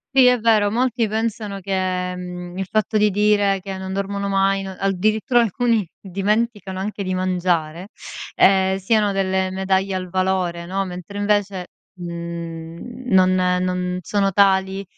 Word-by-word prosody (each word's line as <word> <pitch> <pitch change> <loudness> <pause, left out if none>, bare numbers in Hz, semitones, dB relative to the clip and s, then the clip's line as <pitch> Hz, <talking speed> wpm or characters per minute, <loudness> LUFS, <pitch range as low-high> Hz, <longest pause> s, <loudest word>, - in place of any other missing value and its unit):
Sì 265 -1 +7
è 250 -1 +5
vero, 215 -2 +3
molti 240 0 +1
pensano 215 -2 -3
che, 185 -1 -2
mhmm, 180 0 -7
il 195 - -2
fatto 215 +2 0
di 210 0 +3
dire 205 -1 +2
che 190 0 -6
non 190 0 -5
dormono 200 +1 -2
mai 195 0 +1
no 190 -1 -7
addirittura 215 +6 +2
alcuni 230 -2 +1
dimenticano 200 0 -1
anche 200 +1 -4
di 185 -1 -2
mangiare, 180 -1 -1 0.4
ehm, 190 0 +4
siano 205 +1 +2
delle 190 -1 0
medaglie 190 +1 0
al 185 -1 -3
valore, 185 -2 -1
no. 190 +2 -1
Mentre 180 +2 -7
invece, 205 -3 0 0.3
mhmm, 170 +5 -7
non 185 0 +5
non 180 0 0
sono 195 +2 0
tali 195 0 +3
190 Hz, 145 wpm, -21 LUFS, 185-205 Hz, 0.4 s, Sì